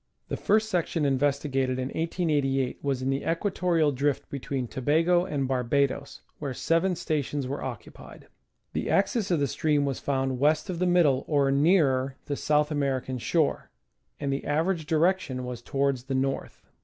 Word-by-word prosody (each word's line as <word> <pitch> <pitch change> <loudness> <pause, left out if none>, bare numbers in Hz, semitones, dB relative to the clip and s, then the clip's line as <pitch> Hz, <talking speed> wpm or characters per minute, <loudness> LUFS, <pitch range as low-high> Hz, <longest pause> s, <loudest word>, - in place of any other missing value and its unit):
The - - -1
first 215 +1 +2
section 170 -5 0
investigated 135 -1 +1
in 130 0 -2
1888 145 -6 0
was 135 -2 -1
in 135 - 0
the 135 +1 -2
equatorial 170 -3 +1
drift 140 +1 -1
between 135 -2 -3
Tobago 165 - +2
and 140 -6 -2
Barbados, 135 +2 0 0.2
where 140 -4 -4
seven 165 +6 +1
stations 150 -4 -2
were 140 +2 -4
occupied. 125 -5 -8 0.5
The - - -2
axis 200 +1 +1
of 170 -4 +2
the 140 - +2
stream 145 +1 +1
was 135 -2 -2
found 135 -2 -1
west 155 +6 +2
of 170 - -5
the 180 - +2
middle, 160 -7 +3
or 140 -3 +2
nearer 140 -3 +3
the 145 - -2
South 150 +1 +1
American 135 -3 -1
shore, 155 +5 0 0.5
and 140 -1 -1
the 135 - -3
average 160 +2 0
direction 160 -6 +1
was 125 -1 -6
towards 135 0 -1
the 135 - -2
north. 135 +1 -2
140 Hz, 160 wpm, -27 LUFS, 135-165 Hz, 0.5 s, middle